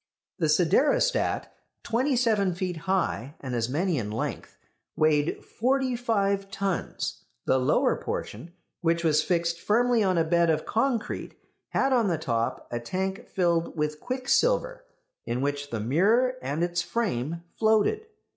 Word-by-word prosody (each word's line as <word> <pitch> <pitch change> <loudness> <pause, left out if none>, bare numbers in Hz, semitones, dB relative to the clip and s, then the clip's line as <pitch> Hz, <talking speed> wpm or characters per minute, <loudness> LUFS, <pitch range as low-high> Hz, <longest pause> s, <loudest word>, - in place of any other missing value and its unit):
The 160 - +2
siderostat, 185 - +2 0.3
twenty 255 +4 +1
seven 215 -7 +2
feet 180 -1 -2
high, 165 -7 0
and 130 -2 -5
as 115 -1 -1
many 165 +2 0
in 105 -3 -4
length, 110 +2 -4 0.4
weighed 155 -1 +1
forty 260 +1 0
five 200 -4 0
tons. 195 -1 -3 0.2
The 130 - +3
lower 130 - +2
portion, 125 +11 -5 0.3
which 170 0 +1
was 155 -2 +4
fixed 170 -2 0
firmly 235 +4 +2
on 185 -3 +2
a 165 - +4
bed 170 +1 +2
of 155 -1 +1
concrete, 230 0 -1 0.3
had 270 0 +1
on 235 -4 +3
the 170 -4 +1
top 125 -3 -2
a 120 - -2
tank 190 +10 -3
filled 170 -2 0
with 150 0 -1
quicksilver, - - 0 0.4
in 120 +1 -1
which 145 +1 -2
the 115 - -3
mirror 200 - +3
and 150 +4 -2
its 175 0 0
frame 170 - -2 0.2
floated. 225 - +2
175 Hz, 145 wpm, -27 LUFS, 150-230 Hz, 0.4 s, was